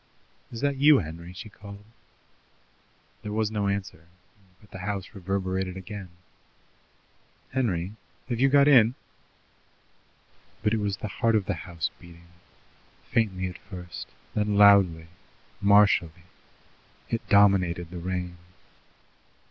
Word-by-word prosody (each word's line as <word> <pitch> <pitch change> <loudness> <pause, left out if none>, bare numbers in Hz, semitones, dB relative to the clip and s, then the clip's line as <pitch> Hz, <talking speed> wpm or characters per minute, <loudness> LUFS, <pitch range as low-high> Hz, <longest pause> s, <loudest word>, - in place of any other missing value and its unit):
"Is 115 - -7
that 140 -1 0
you, 145 +1 +6
Henry?" 85 -2 -6
she 90 +4 -9
called. 100 0 -12 1.4
There 105 - -6
was 110 0 0
no 105 -2 -1
answer, 95 -5 -4 0.5
but 105 - -22
the 95 - -8
house 100 0 -4
reverberated 95 -1 -3
again. 95 0 -8 1.4
"Henry, 100 -8 -1 0.3
have 120 -2 -3
you 135 +2 +4
got 140 +1 +5
in?" 125 -4 +6 1.7
But 105 0 +2
it 110 - +1
was 100 -2 -2
the 105 - -5
heart 115 +3 +1
of 105 -3 +1
the 100 - -1
house 85 0 -4
beating, 85 -1 -16 0.8
faintly 95 -5 0
at 90 -1 -6
first, 90 -3 -9 0.3
then 105 -1 0
loudly, 100 -5 +6 0.6
martially. 100 -5 +4 0.9
It 115 - -3
dominated 90 -4 +3
the 90 - -6
rain. 90 0 -4
100 Hz, 120 wpm, -26 LUFS, 90-105 Hz, 1.7 s, you